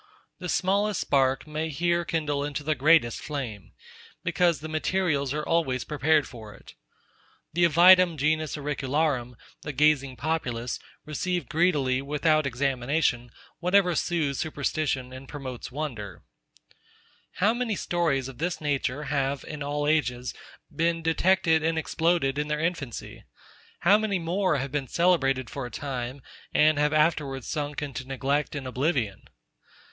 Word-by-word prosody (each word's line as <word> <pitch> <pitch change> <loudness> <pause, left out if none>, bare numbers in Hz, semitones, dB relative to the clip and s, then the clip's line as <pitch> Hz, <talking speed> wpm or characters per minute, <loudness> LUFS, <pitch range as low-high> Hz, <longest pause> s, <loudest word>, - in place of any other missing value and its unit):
The 180 -1 -5
smallest 200 +3 +1
spark 135 -1 +1
may 155 +1 -3
here 170 +3 +1
kindle 150 -3 -1
into 145 0 -4
the 155 +2 +1
greatest 140 -3 +3
flame; 125 - -5 0.5
because 170 -1 +2
the 155 - -6
materials 155 -3 0
are 150 +1 -2
always 145 -7 +1
prepared 150 0 +2
for 110 -4 -11
it. - - -15 0.8
The 175 +2 +4
avidum 175 +1 +6
genus 155 +1 0
auricularum, 145 -3 -1 0.3
the 150 - -5
gazing 140 -2 +2
populace, 125 -5 -2 0.3
receive 175 +4 -2
greedily, 145 -6 +2
without 150 +1 +1
examination, 130 -1 0 0.3
whatever 180 0 +3
sooths 155 -5 0
superstition, 145 -4 -2
and 130 +1 -10
promotes 130 -4 -7
wonder. 120 -9 -5 0.5
Lucret. - - -33 0.5
How 205 +4 +2
many 240 -3 -1
stories 160 -9 0
of 135 -1 -10
this 175 +2 -1
nature 145 -1 -1
have, 140 -1 -1
in 150 -1 -7
all 145 +1 -2
ages, 125 -5 0 0.4
been 165 0 0
detected 165 0 +3
and 160 +1 0
exploded 160 -3 +1
in 150 - -1
their 150 0 -1
infancy? 160 -7 -4 0.6
How 200 +4 +5
many 215 -3 0
more 175 0 0
have 135 0 -3
been 140 -2 -2
celebrated 135 -8 +2
for 135 -3 -4
a - - -10
time, 130 -1 -5 0.3
and 155 -1 +4
have 150 0 +2
afterwards 150 -4 +1
sunk 145 -1 -3
into 135 -3 -5
neglect 140 +3 -1
and 140 -2 -5
oblivion? 130 - -1
150 Hz, 140 wpm, -26 LUFS, 135-165 Hz, 0.8 s, avidum